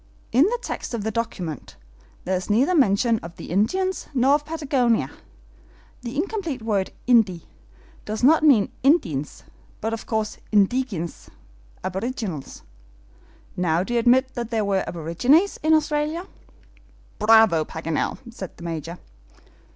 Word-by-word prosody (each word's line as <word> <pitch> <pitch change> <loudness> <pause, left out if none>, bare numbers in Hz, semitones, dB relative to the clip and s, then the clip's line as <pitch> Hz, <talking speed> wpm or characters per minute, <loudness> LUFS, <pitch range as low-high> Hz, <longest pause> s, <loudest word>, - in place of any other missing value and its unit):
In 260 +7 +5
the 475 +5 0
text - - -4
of 220 - -4
the 220 - -1
document, 185 - -4 0.5
there 185 - 0
is 185 +2 -4
neither 255 - +3
mention 230 - +3
of 170 +1 -10
the - - -9
Indians 370 - 0
nor 260 +2 +4
of 295 0 +1
Patagonia! 270 -7 0 0.9
The 240 +2 -6
incomplete 335 - -3
word 205 -4 0 0.2
INDI 220 -8 +3 0.6
does 215 +2 -5
not 310 +5 +6
mean 270 -10 +4
INDIENS, 175 - +1 0.4
but 225 +1 -2
of 225 - -6
course, 220 -2 -2
INDIGENES, 205 -4 0 0.5
aborigines! 190 - -4 0.9
Now, 175 -1 +1
do 240 - -5
you 240 - +3
admit 260 +3 +3
that 235 -3 -4
there 225 -2 0
are 195 -1 +1
aborigines 245 - +2
in 315 +1 +4
Australia?" 305 +3 -1 0.9
"Bravo, 220 -6 +5
Paganel!" 160 0 -3 0.2
said 190 -6 -8
the 170 - -11
Major. 165 0 -5
225 Hz, 135 wpm, -23 LUFS, 185-275 Hz, 0.9 s, not